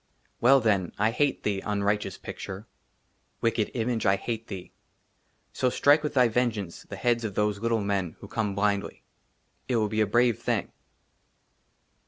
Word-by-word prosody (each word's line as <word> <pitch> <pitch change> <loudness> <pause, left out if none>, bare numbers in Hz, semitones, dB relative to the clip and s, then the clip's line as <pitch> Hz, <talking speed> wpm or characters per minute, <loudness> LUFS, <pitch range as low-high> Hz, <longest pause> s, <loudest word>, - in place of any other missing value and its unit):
WELL, 135 +3 +6
THEN, 100 -6 +1
I 105 +2 +2
HATE 140 +3 0
THEE, 100 -2 -1
UNRIGHTEOUS 105 0 -1
PICTURE; 95 +3 -7 0.8
WICKED 115 -2 +1
IMAGE, 115 -2 0
I 95 - +5
HATE 115 +2 -4
THEE; 95 -3 -7 0.8
SO, 130 - +1
STRIKE 145 +4 +4
WITH 150 -1 -3
THY 125 -2 +6
VENGEANCE 110 -6 -1
THE - - -5
HEADS 120 -1 +1
OF 105 -3 -4
THOSE 105 -1 +1
LITTLE 115 0 +1
MEN 100 -5 -1
WHO 100 - -10
COME 105 -2 -2
BLINDLY. 100 0 -1 0.6
IT 125 - 0
WILL 110 -2 +1
BE 110 +1 0
A 105 - +3
BRAVE 120 +1 +3
THING. - - -1
110 Hz, 160 wpm, -27 LUFS, 100-120 Hz, 0.8 s, WELL